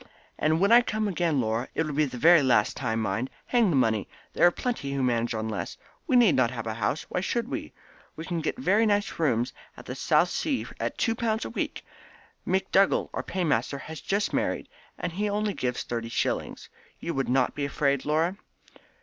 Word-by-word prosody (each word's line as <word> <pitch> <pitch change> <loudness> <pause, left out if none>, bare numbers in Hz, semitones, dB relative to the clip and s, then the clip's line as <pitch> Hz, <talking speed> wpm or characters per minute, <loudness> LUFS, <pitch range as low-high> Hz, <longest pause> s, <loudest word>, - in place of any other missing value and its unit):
And 155 +1 +2
when 200 +4 +3
I 240 +1 +9
come 215 -2 -1
again, 170 -6 0
Laura, 115 +1 -1
it 160 - +1
will 150 - -4
be 155 +2 +2
the 150 +6 +5
last 120 -5 +3
time 115 -4 -1
mind! 110 +5 -1 0.2
Hang 235 -5 +3
the 165 - +1
money! 110 -5 +2 0.3
There - - +5
are - - +4
plenty 175 - -3
who 135 -1 -1
manage 120 -2 0
on 110 0 -2
less. 110 - -4 0.3
We 265 - +2
need 235 -8 +6
not 125 -2 +3
have 115 -2 -6
a 110 - -2
house. 110 +7 -1
Why 180 - -1
should 235 +4 -1
we? - - -4 0.5
You 160 - -6
can 170 -2 -2
get 160 - -2
very 225 -3 +3
nice 205 -3 0
rooms 120 -7 +1 0.2
in 125 - -7
Southsea 175 - +1
at - - -3
2 225 - +1
pounds 225 -1 -1
a - - -5
week. - - -4 0.6
McDougall, 190 +1 +2
our - - -2
paymaster, 170 -5 -1
has 155 +3 -8
just 200 +2 -1
married, - - -1 0.3
and - - -3
he 205 +5 -1
only 210 0 0
gives 125 -6 -2
thirty 115 -1 -4
shillings. - - -2 0.3
You 170 - -3
would 135 -2 -1
not 130 0 +2
be 145 - -4
afraid, 140 -1 0
Laura?" 160 +5 +1
155 Hz, 200 wpm, -27 LUFS, 125-200 Hz, 0.6 s, I